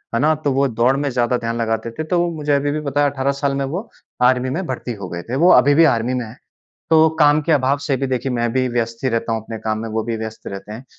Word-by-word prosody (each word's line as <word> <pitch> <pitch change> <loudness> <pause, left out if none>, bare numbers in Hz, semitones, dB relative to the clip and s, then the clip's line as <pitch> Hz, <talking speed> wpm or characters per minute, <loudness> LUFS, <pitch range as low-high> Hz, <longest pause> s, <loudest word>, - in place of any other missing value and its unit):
है - - +2
ना? 155 +2 +4
तो 150 -1 -2
वो 140 +1 +2
दौड़ 120 +2 +2
में 145 0 -1
ज़्यादा 125 -1 +1
ध्यान 115 0 -3
लगाते 115 0 -2
थे 155 +7 -5
तो 175 +2 0
मुझे 150 -1 -1
अभी 145 +1 0
भी 150 +1 -2
पता 145 0 -1
है 145 - +3
18 140 0 0
साल 140 - +2
में 140 - -1
वो 180 - -5 0.3
आर्मी 125 +1 +3
में 175 +8 -3
भर्ती 125 -2 -4
हो 90 - -5
गए 85 0 -5
थे। 125 - -2
वो 170 +6 +5
अभी 135 +1 +6
भी 165 - +6
आर्मी 115 +2 -2
में 125 -2 -2
हैं। 115 +5 -12 0.5
तो 160 0 +6
काम 150 +1 +5
के 165 - +1
अभाव 140 -1 +2
से 135 - +1
भी 135 +1 -2
देखिए, 130 0 -2
मैं 120 -1 -1
भी 130 0 +1
व्यस्त 115 0 -3
ही - - +3
रहता 115 0 -1
हूँ 110 -1 -2
अपने 110 0 -7
काम 110 0 -2
में, 115 +1 -5
वो 110 0 -2
भी 115 -1 -2
व्यस्त 110 0 -7
रहते 100 +1 -7
हैं। 115 +5 -9
130 Hz, 290 wpm, -19 LUFS, 115-145 Hz, 0.5 s, अभी